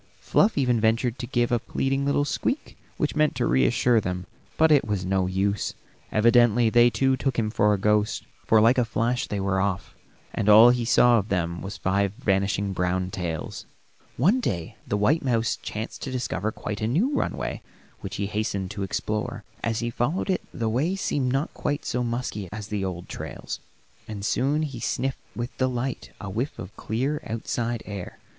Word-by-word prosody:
Fluff 210 Hz, -2 st, +2 dB
even 125 Hz, -5 st, +2 dB
ventured 115 Hz, +3 st, +1 dB
to 120 Hz, -, -4 dB
give 120 Hz, 0 st, +1 dB
a 120 Hz, -, +3 dB
pleading 135 Hz, +4 st, -1 dB
little 145 Hz, 0 st, +2 dB
squeak 265 Hz, -, -2 dB, 0.2 s
which -, -, -1 dB
meant 155 Hz, 0 st, +2 dB
to -, -, 0 dB
reassure 65 Hz, -, +3 dB
them, 90 Hz, -1 st, -3 dB, 0.3 s
but 160 Hz, 0 st, +5 dB
it 145 Hz, -3 st, +6 dB
was 105 Hz, -4 st, -2 dB
no 95 Hz, 0 st, +1 dB
use; 100 Hz, +2 st, -1 dB, 0.4 s
evidently 120 Hz, 0 st, +4 dB
they 120 Hz, +1 st, +6 dB
too 135 Hz, +2 st, +2 dB
took 135 Hz, 0 st, -2 dB
him 110 Hz, -2 st, 0 dB
for 105 Hz, -1 st, +3 dB
a 105 Hz, -, +2 dB
ghost, 105 Hz, +1 st, +1 dB, 0.2 s
for 110 Hz, -, +6 dB
like 115 Hz, +4 st, +5 dB
a -, -, +4 dB
flash 115 Hz, +2 st, -1 dB
they 105 Hz, -, -3 dB
were 95 Hz, -1 st, +1 dB
off, 95 Hz, -1 st, -2 dB, 0.4 s
and 105 Hz, -, 0 dB
all 110 Hz, +3 st, +9 dB
he 120 Hz, -1 st, 0 dB
saw 120 Hz, 0 st, +5 dB
of 105 Hz, -, -5 dB
them 85 Hz, -2 st, -1 dB
was 100 Hz, +1 st, -6 dB
five 100 Hz, +1 st, +1 dB
vanishing 100 Hz, -3 st, 0 dB
brown 90 Hz, 0 st, -1 dB
tails. 85 Hz, -4 st, -4 dB, 0.5 s
One 190 Hz, -, +4 dB
day 85 Hz, -, -3 dB
the 105 Hz, -, 0 dB
white 135 Hz, +11 st, +2 dB
mouse 115 Hz, -4 st, +1 dB
chanced 110 Hz, +2 st, -5 dB
to 135 Hz, -, -4 dB
discover 110 Hz, -5 st, -2 dB
quite 105 Hz, -1 st, -5 dB
a 110 Hz, -, +1 dB
new 210 Hz, -, +1 dB
runway -, -, -2 dB, 0.4 s
which 95 Hz, +1 st, -6 dB
he 100 Hz, -, -1 dB
hastened 100 Hz, -2 st, -2 dB
to 105 Hz, -1 st, -5 dB
explore. 105 Hz, +2 st, -2 dB, 0.2 s
As 115 Hz, 0 st, 0 dB
he 120 Hz, 0 st, -2 dB
followed 150 Hz, +12 st, 0 dB
it 185 Hz, -, 0 dB
the 115 Hz, -, -2 dB
way 140 Hz, +12 st, +1 dB
seemed 140 Hz, -9 st, 0 dB
not 135 Hz, +4 st, -1 dB
quite 145 Hz, 0 st, -2 dB
so 125 Hz, -, -1 dB
musky 115 Hz, -5 st, -3 dB
as 105 Hz, 0 st, -6 dB
the 105 Hz, -2 st, -2 dB
old 90 Hz, -2 st, -4 dB
trails, -, -, -6 dB, 0.5 s
and 105 Hz, -2 st, -5 dB
soon 145 Hz, +7 st, +1 dB
he 135 Hz, -6 st, -5 dB
sniffed 135 Hz, +3 st, -2 dB
with 120 Hz, +2 st, -4 dB
delight 130 Hz, 0 st, -1 dB
a 105 Hz, -, -6 dB
whiff 115 Hz, +9 st, -3 dB
of 105 Hz, -, -8 dB
clear, 135 Hz, +7 st, -2 dB
outside 115 Hz, +1 st, -2 dB
air. 100 Hz, -3 st, -7 dB
115 Hz, 190 wpm, -25 LUFS, 100-125 Hz, 0.5 s, all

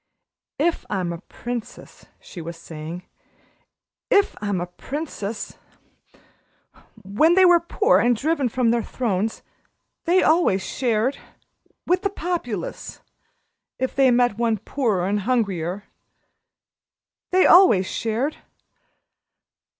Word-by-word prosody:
"If 330 Hz, +3 st, 0 dB
I'm 180 Hz, -3 st, -2 dB
a 170 Hz, -, -7 dB
princess," 240 Hz, +2 st, -8 dB
she 175 Hz, -, -10 dB
was 170 Hz, +1 st, -7 dB
saying 165 Hz, +2 st, -8 dB, 1.1 s
"if 405 Hz, -1 st, +3 dB
I'm 205 Hz, -3 st, -1 dB
a 175 Hz, -, -2 dB
princess! 220 Hz, -, -6 dB, 1.4 s
When 265 Hz, -, +3 dB
they 375 Hz, 0 st, +6 dB
were 350 Hz, -1 st, +6 dB
poor 410 Hz, +7 st, +2 dB
and 240 Hz, 0 st, +3 dB
driven 285 Hz, +1 st, 0 dB
from 240 Hz, 0 st, +1 dB
their 235 Hz, 0 st, +1 dB
thrones 220 Hz, -3 st, -2 dB, 0.6 s
they 360 Hz, +2 st, +3 dB
always 310 Hz, -, +3 dB
shared 245 Hz, +1 st, -1 dB, 0.7 s
with 360 Hz, +1 st, +1 dB
the 400 Hz, -, 0 dB
Populace 330 Hz, -, -5 dB, 0.8 s
if 260 Hz, -, -3 dB
they 270 Hz, -1 st, +5 dB
met 245 Hz, -3 st, +2 dB
one 230 Hz, -2 st, +1 dB
poorer 215 Hz, -4 st, -1 dB
and 205 Hz, +1 st, 0 dB
hungrier. 200 Hz, -5 st, -1 dB, 1.5 s
They 370 Hz, +1 st, +4 dB
always 285 Hz, -, +6 dB
shared. 230 Hz, +9 st, -2 dB
235 Hz, 110 wpm, -23 LUFS, 195-310 Hz, 1.5 s, they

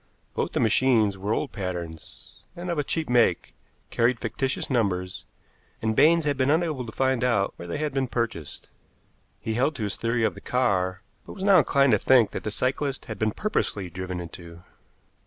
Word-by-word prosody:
Both -, -, -2 dB
the -, -, 0 dB
machines 110 Hz, -3 st, +3 dB
were 100 Hz, +2 st, -4 dB
old -, -, -1 dB
patterns, 90 Hz, -5 st, -7 dB
and 175 Hz, +1 st, -4 dB
of 170 Hz, -, -1 dB
a -, -, +1 dB
cheap 160 Hz, +3 st, -2 dB
make, 120 Hz, -7 st, +2 dB, 0.4 s
carried 120 Hz, 0 st, +2 dB
fictitious 130 Hz, +4 st, -2 dB
numbers, 95 Hz, -8 st, -1 dB, 0.5 s
and 110 Hz, 0 st, -1 dB
Baines 165 Hz, +4 st, +5 dB
had 145 Hz, -2 st, 0 dB
been 130 Hz, 0 st, +2 dB
unable 155 Hz, -4 st, +1 dB
to -, -, -6 dB
find 130 Hz, 0 st, 0 dB
out 110 Hz, -6 st, +1 dB
where 85 Hz, -, -8 dB
they 85 Hz, -, -3 dB
had 150 Hz, -2 st, -2 dB
been 135 Hz, -1 st, 0 dB
purchased. 115 Hz, -, -4 dB, 0.7 s
He 110 Hz, -, -3 dB
held 135 Hz, +6 st, +1 dB
to 115 Hz, -, -4 dB
his 100 Hz, -, -2 dB
theory 115 Hz, 0 st, 0 dB
of -, -, +2 dB
the -, -, -12 dB
car, 95 Hz, -6 st, 0 dB, 0.2 s
but -, -, -8 dB
was 190 Hz, -, -7 dB
now 195 Hz, -2 st, +6 dB
inclined 140 Hz, -2 st, +3 dB
to 105 Hz, -, +4 dB
think 125 Hz, -5 st, +4 dB
that -, -, -5 dB
the -, -, -2 dB
cyclists 135 Hz, +5 st, -2 dB
had 110 Hz, -3 st, -7 dB
been 110 Hz, 0 st, +1 dB
purposely 105 Hz, -, -2 dB
driven 90 Hz, +1 st, -5 dB
into. 85 Hz, 0 st, -10 dB
115 Hz, 195 wpm, -26 LUFS, 100-135 Hz, 0.7 s, now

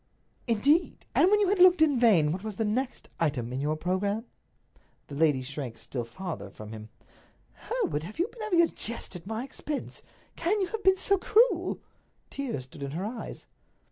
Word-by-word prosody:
"Indeed! 280 Hz, +10 st, +2 dB
And 365 Hz, -, +5 dB
when 420 Hz, +1 st, +4 dB
you 400 Hz, -, +3 dB
had 400 Hz, -1 st, +1 dB
looked 360 Hz, -1 st, +7 dB
in 295 Hz, -5 st, +4 dB
vain, 185 Hz, -11 st, +5 dB
what 185 Hz, +4 st, -4 dB
was 215 Hz, -2 st, -5 dB
the 225 Hz, -, -1 dB
next 245 Hz, +5 st, -2 dB
item 130 Hz, -7 st, -1 dB
in 130 Hz, -, -2 dB
your 150 Hz, +2 st, 0 dB
programme?" 195 Hz, +7 st, -1 dB, 0.8 s
The -, -, -8 dB
lady 145 Hz, -3 st, +2 dB
shrank 130 Hz, -3 st, -6 dB
still 120 Hz, -1 st, -5 dB
farther 120 Hz, -, -6 dB
from 105 Hz, +2 st, -10 dB
him. 110 Hz, -1 st, -9 dB, 0.8 s
"Hereward, 445 Hz, -, 0 dB
have 180 Hz, +7 st, -9 dB
you 350 Hz, -, +1 dB
been 465 Hz, -, -12 dB
having 390 Hz, -6 st, +3 dB
a -, -, +4 dB
jest 230 Hz, -, -4 dB
at 180 Hz, +1 st, -9 dB
my 220 Hz, +2 st, -3 dB
expense? 285 Hz, +2 st, -5 dB, 0.3 s
Can 380 Hz, +6 st, 0 dB
you 385 Hz, -, +2 dB
have 445 Hz, -1 st, -4 dB
been 380 Hz, 0 st, +5 dB
so 395 Hz, +1 st, +2 dB
cruel?" 455 Hz, +6 st, +3 dB, 0.5 s
Tears 260 Hz, -, -3 dB
stood 130 Hz, +3 st, -13 dB
in 140 Hz, 0 st, -4 dB
her 190 Hz, -, -2 dB
eyes. 230 Hz, +2 st, -6 dB
215 Hz, 190 wpm, -28 LUFS, -, 0.8 s, looked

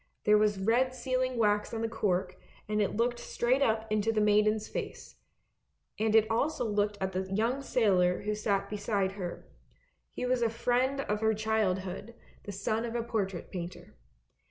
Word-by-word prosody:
There 210 Hz, 0 st, +5 dB
was 210 Hz, -1 st, +2 dB
red 240 Hz, +6 st, +2 dB
sealing 255 Hz, 0 st, -1 dB
wax 210 Hz, 0 st, +1 dB
on 225 Hz, -, -2 dB
the -, -, +1 dB
cork, 190 Hz, -5 st, -1 dB, 0.3 s
and 210 Hz, 0 st, 0 dB
it 205 Hz, -, 0 dB
looked 240 Hz, +1 st, +1 dB
straight 255 Hz, +3 st, 0 dB
up 220 Hz, -4 st, +2 dB
into 215 Hz, +1 st, +2 dB
the 220 Hz, -, 0 dB
maiden's 210 Hz, +1 st, +3 dB
face; -, -, -6 dB, 0.8 s
and 220 Hz, 0 st, +2 dB
it 220 Hz, -1 st, +6 dB
also 245 Hz, +4 st, 0 dB
looked 210 Hz, -1 st, 0 dB
at 190 Hz, 0 st, -1 dB
the 190 Hz, 0 st, -3 dB
young 230 Hz, +7 st, 0 dB
sailor 190 Hz, -9 st, +2 dB
who 210 Hz, +1 st, -1 dB
sat 205 Hz, -2 st, 0 dB
beside 205 Hz, -2 st, -1 dB
her, 185 Hz, -3 st, -6 dB, 0.6 s
he -, -, -4 dB
was 250 Hz, -1 st, +1 dB
a 230 Hz, -, +3 dB
friend 250 Hz, +4 st, +1 dB
of 210 Hz, -4 st, -2 dB
her 220 Hz, 0 st, +2 dB
childhood, 210 Hz, -1 st, -1 dB, 0.3 s
the 205 Hz, -, -5 dB
son 215 Hz, +3 st, -1 dB
of 235 Hz, 0 st, -4 dB
a 235 Hz, -, 0 dB
portrait 200 Hz, -6 st, -3 dB
painter. 180 Hz, -1 st, -7 dB
215 Hz, 175 wpm, -30 LUFS, 200-235 Hz, 0.8 s, it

